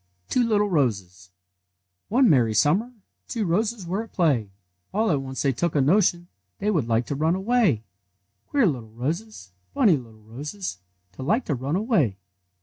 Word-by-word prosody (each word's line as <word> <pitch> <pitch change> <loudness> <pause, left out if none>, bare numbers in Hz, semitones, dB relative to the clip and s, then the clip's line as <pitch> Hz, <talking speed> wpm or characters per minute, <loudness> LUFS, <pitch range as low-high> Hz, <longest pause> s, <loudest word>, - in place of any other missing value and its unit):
TWO 250 - +2
LITTLE 210 -1 +3
ROSES 100 - -1 0.8
One 250 +4 +4
merry 120 - +4
siumiier 190 - +2 0.4
day 230 - -3
T^Yo 205 - 0
roses 210 +3 0
were 190 +5 -2
at 225 - -10
play; 140 - +1 0.5
All 220 -1 +2
at 140 -3 +1
once 130 -2 -4
they 140 - +3
took 170 +8 -1
a - - +4
notion 175 +3 +2 0.3
They 210 - 0
would 155 - 0
like 115 +1 +1
to 140 - -3
run 160 +4 +1
away! 195 - +2 0.7
Queer 280 -4 +3
little 125 - -1
roses, 140 - -5 0.2
Funny 220 - +4
little 110 -4 -13
roses, 140 - -6 0.3
To 95 - -11
like 215 - +1
to 150 - -1
run 135 +4 -2
away! 185 - +1
160 Hz, 170 wpm, -24 LUFS, -, 0.8 s, One